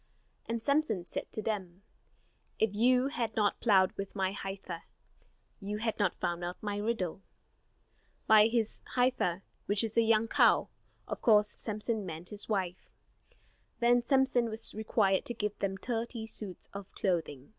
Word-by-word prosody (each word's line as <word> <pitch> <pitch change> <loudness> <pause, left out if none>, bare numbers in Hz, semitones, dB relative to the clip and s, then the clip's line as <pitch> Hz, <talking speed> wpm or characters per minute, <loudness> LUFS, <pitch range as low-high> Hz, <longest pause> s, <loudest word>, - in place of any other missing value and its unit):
And 230 -1 -3
Samson 280 - +1
said - - -5
to 215 - -3
them: 195 -4 -4 0.7
"If 220 -2 +1
you 250 +5 +4
had 230 -6 -3
not 210 -2 +1
plowed 190 -5 +4
with 195 +1 -5
my 190 -1 0
heifer, 195 -3 -6 0.8
You 205 +1 -4
had 225 0 -2
not 195 -4 +2
found 175 0 -2
out 175 +1 -4
my 205 -1 -2
riddle." 205 -4 -2 1.0
By 215 0 +7
his 225 -1 -1
"heifer," 245 -8 +1 0.2
which 205 +2 +2
is 225 0 -3
a - - +7
young 225 0 +3
cow, - - +4 0.4
of - - -5
course 210 -2 +5
Samson 215 0 -3
meant 170 -1 -6
his 210 +1 -4
wife. 185 -4 -2 0.9
Then 240 +1 +4
Samson 260 -2 +2
was 220 +1 0
required 210 -3 +1
to 240 - -3
give 210 -1 -2
them 195 -1 -1
thirty 230 +1 -3
suits 210 -4 -4
of 200 -1 -8
clothing. 160 -8 -2
210 Hz, 155 wpm, -31 LUFS, 190-230 Hz, 1.0 s, By